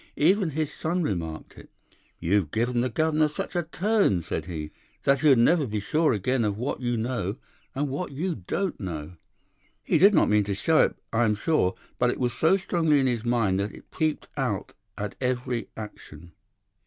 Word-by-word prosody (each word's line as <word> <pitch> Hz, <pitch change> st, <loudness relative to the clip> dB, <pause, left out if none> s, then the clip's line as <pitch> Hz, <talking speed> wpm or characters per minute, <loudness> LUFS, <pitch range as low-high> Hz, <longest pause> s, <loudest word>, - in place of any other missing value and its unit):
Even 185 Hz, +4 st, +3 dB
his 155 Hz, 0 st, -2 dB
son 175 Hz, +3 st, -1 dB
remarked 85 Hz, -, -4 dB
it. -, -, -15 dB, 0.5 s
'You've 95 Hz, -2 st, +1 dB
given 120 Hz, +5 st, 0 dB
the 130 Hz, -, 0 dB
governor 155 Hz, +4 st, +2 dB
such 150 Hz, +4 st, -5 dB
a 175 Hz, -, +2 dB
turn,' 170 Hz, -, +1 dB
said 80 Hz, -1 st, -3 dB
he, 75 Hz, -4 st, -5 dB, 0.3 s
'that 140 Hz, 0 st, +3 dB
he'll 145 Hz, -1 st, +6 dB
never 145 Hz, +5 st, +4 dB
be 105 Hz, -1 st, -2 dB
sure 155 Hz, +10 st, +2 dB
again 120 Hz, +3 st, 0 dB
of 105 Hz, -1 st, -1 dB
what 125 Hz, +3 st, -3 dB
you 120 Hz, -1 st, 0 dB
know 110 Hz, -4 st, -2 dB, 0.4 s
and 145 Hz, +2 st, 0 dB
what 140 Hz, +4 st, -4 dB
you 170 Hz, +6 st, -2 dB
don't 165 Hz, -, -3 dB
know.' 85 Hz, -4 st, -5 dB, 0.7 s
He 160 Hz, -, +2 dB
did 200 Hz, +4 st, +7 dB
not -, -, +5 dB
mean 105 Hz, 0 st, +3 dB
to 100 Hz, -1 st, -2 dB
show 155 Hz, +12 st, +3 dB
it, -, -, -4 dB, 0.2 s
I 115 Hz, +1 st, +3 dB
am 105 Hz, -1 st, +2 dB
sure, 105 Hz, -, +1 dB, 0.2 s
but 125 Hz, -, +3 dB
it -, -, -2 dB
was 125 Hz, -2 st, 0 dB
so 160 Hz, +9 st, +3 dB
strongly 165 Hz, -5 st, +2 dB
in 135 Hz, -, +2 dB
his 120 Hz, -3 st, 0 dB
mind 115 Hz, -6 st, +1 dB
that 100 Hz, +1 st, -3 dB
it -, -, -16 dB
peeped 155 Hz, -2 st, -1 dB
out -, -, -2 dB, 0.2 s
at 105 Hz, -1 st, -4 dB
every 125 Hz, -4 st, -1 dB
action. 85 Hz, -6 st, -10 dB
125 Hz, 190 wpm, -26 LUFS, 105-155 Hz, 0.7 s, did